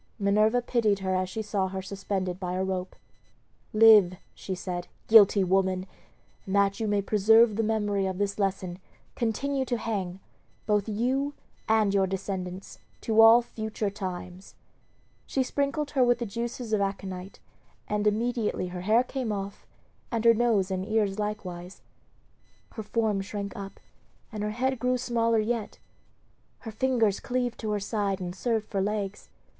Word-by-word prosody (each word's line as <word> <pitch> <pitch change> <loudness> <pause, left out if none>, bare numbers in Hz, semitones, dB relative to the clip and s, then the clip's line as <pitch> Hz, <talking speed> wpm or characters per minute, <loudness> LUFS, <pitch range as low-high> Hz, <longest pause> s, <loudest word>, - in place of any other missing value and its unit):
Minerva 215 +3 +2
pitied 225 -5 +1
her 190 -1 -1
as 185 0 0
she 220 +3 -4
saw 200 -2 -1
her 190 0 -5
suspended 190 -2 -3
by 180 -2 -3
a 185 - 0
rope. 185 -1 -3 0.8
"Live," 215 -4 +7 0.2
she 190 - -5
said, 180 -1 -5 0.2
"guilty 205 -3 +7
woman! 185 0 +1 0.6
and 190 - -2
that 200 +1 +2
you 220 - -1
may 205 -1 +1
preserve 220 +2 +5
the 225 - +1
memory 205 -3 0
of 190 -1 -3
this 200 +1 -2
lesson, 190 -2 -2 0.4
continue 265 +4 -1
to 245 -2 -1
hang, 195 -5 -3 0.5
both 210 0 +1
you 260 +7 -1 0.3
and 215 -2 +3
your 195 -1 +3
descendants, 190 -1 -5 0.2
to 225 0 +4
all 225 +2 +8
future 220 -3 -4
times." 185 -1 -7 0.7
She 265 - 0
sprinkled 285 +3 -2
her 265 -3 +3
with 245 -1 +3
the 240 - -3
juices 235 +2 -4
of 210 - +2
aconite, 195 -1 -4 0.5
and 210 0 0
immediately 220 -3 0
her 180 0 -6
hair 220 +6 +3
came 255 -3 -3
off, 200 -1 -5 0.4
and 230 -1 -1
her 230 - +8
nose 220 -5 +1
and 185 0 -1
ears 210 -1 0
likewise. 185 -4 -5 0.9
Her 220 - -6
form 215 -2 0
shrank 200 0 -5
up, 195 -1 -8 0.5
and 215 -2 -5
her 210 - -1
head 255 +3 -1
grew 250 +2 +1
smaller 230 -2 +1
yet; 220 0 -2 0.8
her 225 - -7
fingers 225 -3 +1
cleaved 245 -1 -2
to 220 - -4
her 210 -1 0
side 200 -1 -1
and 180 -1 -5
served 220 +1 -1
for 195 - -2
legs. 205 0 -3
210 Hz, 160 wpm, -27 LUFS, 195-230 Hz, 0.9 s, all